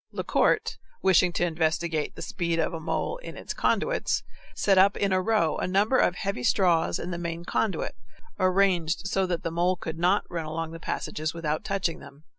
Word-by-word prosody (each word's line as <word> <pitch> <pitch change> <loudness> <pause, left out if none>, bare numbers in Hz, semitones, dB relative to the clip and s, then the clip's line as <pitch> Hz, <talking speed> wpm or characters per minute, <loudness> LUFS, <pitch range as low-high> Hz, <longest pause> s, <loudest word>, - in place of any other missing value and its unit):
Lecourt, - - +1 0.2
wishing 185 -1 +5
to 175 - +1
investigate 160 -1 -1
the - - -7
speed 170 -2 -2
of 165 +2 0
a 165 - -4
mole 170 - -2
in - - -9
its - - -5
conduits, - - 0 0.3
set 195 -2 +3
up 195 +2 +5
in 200 -1 +1
a 185 - +3
row 185 -6 +1
a - - -1
number 205 +7 +3
of 180 - +3
heavy 200 -9 -3
straws 170 +4 +2
in 180 - -5
the 170 - -4
main 170 0 -4
conduit, 215 +2 -1 0.5
arranged 185 -2 +2
so 195 -1 +1
that 175 -2 -2
the 165 - -2
mole 175 +2 +1
could 165 -2 -6
not 180 +4 +2
run 165 -2 -4
along 160 +1 -4
the 165 - -8
passages 155 -1 -3
without 155 +1 -2
touching 195 -5 -1
them. 140 +2 -14
175 Hz, 195 wpm, -27 LUFS, 165-195 Hz, 0.5 s, wishing